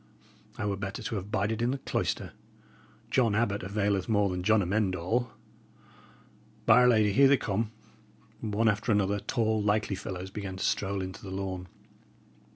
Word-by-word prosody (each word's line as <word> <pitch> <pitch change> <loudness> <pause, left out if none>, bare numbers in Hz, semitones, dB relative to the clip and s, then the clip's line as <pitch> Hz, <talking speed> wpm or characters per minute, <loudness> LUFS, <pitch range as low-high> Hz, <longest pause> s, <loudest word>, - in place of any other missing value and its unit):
I 105 - -2
were 100 -1 -1
better 100 +4 -5
to 110 - -3
have 100 +1 -6
bided 105 +2 -1
in 120 - +2
the 135 - -1
cloister. - - -2 0.8
John 115 -6 +3
Abbot 105 -2 +1
availeth 100 0 -1
more 105 -2 +3
than 90 0 -3
John 105 +2 +3
Amend 95 +1 0
All. 115 +8 -1 1.3
By 115 +2 +7
'r 125 - +6
Lady! 110 -4 +4
here 140 +6 +6
they 140 0 +5
come." 110 0 -2 0.7
One 110 0 0
after 110 +2 +1
another, 100 0 +2
tall, 110 0 0
likely 105 0 +1
fellows 95 -1 -6
began 100 -2 -5
to 95 - -2
stroll 100 -1 0
into 95 0 -7
the 100 - -8
lawn. 95 -1 -4
105 Hz, 165 wpm, -29 LUFS, 95-110 Hz, 1.3 s, By